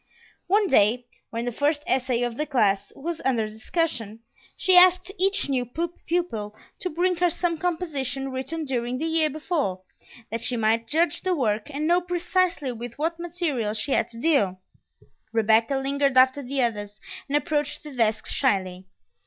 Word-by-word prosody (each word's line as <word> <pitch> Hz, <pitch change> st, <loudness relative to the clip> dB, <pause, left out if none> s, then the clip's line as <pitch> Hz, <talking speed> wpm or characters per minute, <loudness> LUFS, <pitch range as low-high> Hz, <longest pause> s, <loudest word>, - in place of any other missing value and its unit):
One 410 Hz, +3 st, +3 dB
day, 240 Hz, -, +3 dB, 0.2 s
when 230 Hz, +1 st, -4 dB
the 245 Hz, -, -1 dB
first 290 Hz, +4 st, 0 dB
essay 255 Hz, -2 st, 0 dB
of 240 Hz, -1 st, -2 dB
the 300 Hz, +4 st, -2 dB
class 205 Hz, -8 st, +1 dB
was 330 Hz, +3 st, -4 dB
under 235 Hz, -5 st, +1 dB
discussion, 225 Hz, -, -3 dB, 0.4 s
she 375 Hz, -, +3 dB
asked 365 Hz, +1 st, +6 dB
each 390 Hz, -1 st, +1 dB
new 260 Hz, -3 st, 0 dB
pupil 325 Hz, -5 st, -3 dB, 0.2 s
to 365 Hz, -, -2 dB
bring 355 Hz, +2 st, 0 dB
her 355 Hz, 0 st, +3 dB
some 345 Hz, 0 st, 0 dB
composition 285 Hz, -7 st, -2 dB
written 270 Hz, +5 st, -4 dB
during 250 Hz, -2 st, -2 dB
the 310 Hz, -, -2 dB
year 320 Hz, -1 st, +2 dB
before, 295 Hz, -, -2 dB, 0.5 s
that 230 Hz, 0 st, -3 dB
she 245 Hz, +1 st, 0 dB
might 225 Hz, +1 st, +1 dB
judge 315 Hz, +2 st, +1 dB
the 370 Hz, -1 st, 0 dB
work, 215 Hz, -6 st, -1 dB
and 295 Hz, +1 st, -3 dB
know 350 Hz, +2 st, +3 dB
precisely 355 Hz, -4 st, 0 dB
with 235 Hz, 0 st, -8 dB
what 330 Hz, +3 st, -2 dB
material 315 Hz, -11 st, -2 dB
she 225 Hz, +6 st, -2 dB
had 230 Hz, -, +2 dB
to 230 Hz, -, -8 dB
deal. 230 Hz, -, +2 dB, 0.7 s
Rebecca 225 Hz, +3 st, +3 dB
lingered 275 Hz, 0 st, +1 dB
after 260 Hz, +2 st, +5 dB
the 270 Hz, 0 st, -1 dB
others, 210 Hz, -3 st, -3 dB, 0.3 s
and 290 Hz, +1 st, +2 dB
approached 295 Hz, -1 st, -2 dB
the 300 Hz, -, -9 dB
desk 220 Hz, -2 st, +1 dB
shyly. 185 Hz, -7 st, 0 dB
270 Hz, 165 wpm, -25 LUFS, 230-330 Hz, 0.7 s, asked